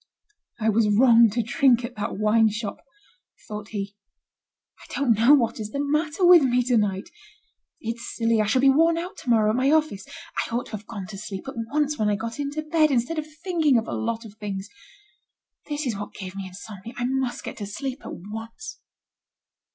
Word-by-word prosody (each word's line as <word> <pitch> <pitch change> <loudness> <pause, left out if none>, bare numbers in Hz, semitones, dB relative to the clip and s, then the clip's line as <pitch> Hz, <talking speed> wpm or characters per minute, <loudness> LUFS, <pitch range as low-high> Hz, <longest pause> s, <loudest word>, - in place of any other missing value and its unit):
"I 220 0 +2
was 220 0 +3
wrong 230 +1 +6
to 235 +3 -1
drink 245 +1 +3
at 240 - -8
that 205 -2 -4
wine 215 +1 +4
shop," 215 0 -5 0.6
thought 210 -1 -6
he. 200 -2 -5 0.8
"I - - -15
don't 275 -5 +3
know 230 +7 +6
what 235 -5 0
is 210 -1 -4
the 280 - -4
matter 300 +4 +1
with 350 -2 +9
me 250 -2 +2
to 245 0 +1
night. 200 -3 0 0.7
It's 235 +1 -5
silly. 230 -1 +2
I 210 - 0
shall 255 +4 +2
be 275 - +6
worn 330 +4 +4
out 360 +4 -5
to - - -7
morrow 215 -2 +4
at - - -1
my 260 +2 +2
office. 305 -11 +1 0.4
I 230 - -4
ought 240 - -1
to - - -13
have 215 -1 -7
gone 210 -5 -6
to 195 0 -8
sleep 195 0 -7
at 270 - -5 0.2
once, 295 0 0
when 210 -1 +2
I 205 - +2
got 230 +5 -5
into 290 +2 -3
bed, 310 0 +3
instead 270 +5 0
of 305 - -5 0.2
thinking 320 -8 +3
of 225 - -1
a - - -4
lot 230 0 -2
of 210 - -11
things. 200 -1 -5 1.0
That 295 0 -2
is 240 -5 -1
what 205 +1 -7
gave 185 -1 -7
me 195 -1 -5
insomnia. 200 +4 -10
I 245 - -1
must 260 -1 -1
get - - -7
to 205 - -5
sleep 260 +6 -5
at - - -7
once." 225 +9 -8
230 Hz, 210 wpm, -25 LUFS, 210-280 Hz, 1.0 s, with